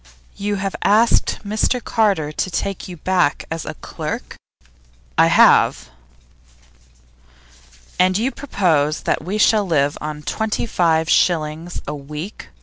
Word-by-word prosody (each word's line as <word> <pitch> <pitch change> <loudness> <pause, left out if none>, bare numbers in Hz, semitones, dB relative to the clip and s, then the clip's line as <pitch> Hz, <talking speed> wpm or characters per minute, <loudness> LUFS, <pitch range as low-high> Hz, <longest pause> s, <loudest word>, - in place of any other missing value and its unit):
'You 205 +1 -2
have 195 0 -3
asked 220 +3 +3
Mr 215 +4 0
Carter 200 -11 0
to 170 - -2
take 195 +1 -3
you 180 -2 -9
back 180 -3 0
as 165 -1 -4
a - - -5
clerk?' - - -6 0.8
'I - - +5
have.' - - +4 2.1
'And 185 +1 +3
you 240 +5 0
propose 165 - 0
that - - -1
we 190 +6 -3
shall 215 0 +4
live 145 -4 +1
on 150 0 -6
twenty 220 +9 -2
five 165 -7 +1
shillings 165 0 0
a 150 - -3
week? 150 +6 -8
180 Hz, 130 wpm, -20 LUFS, 155-205 Hz, 2.1 s, I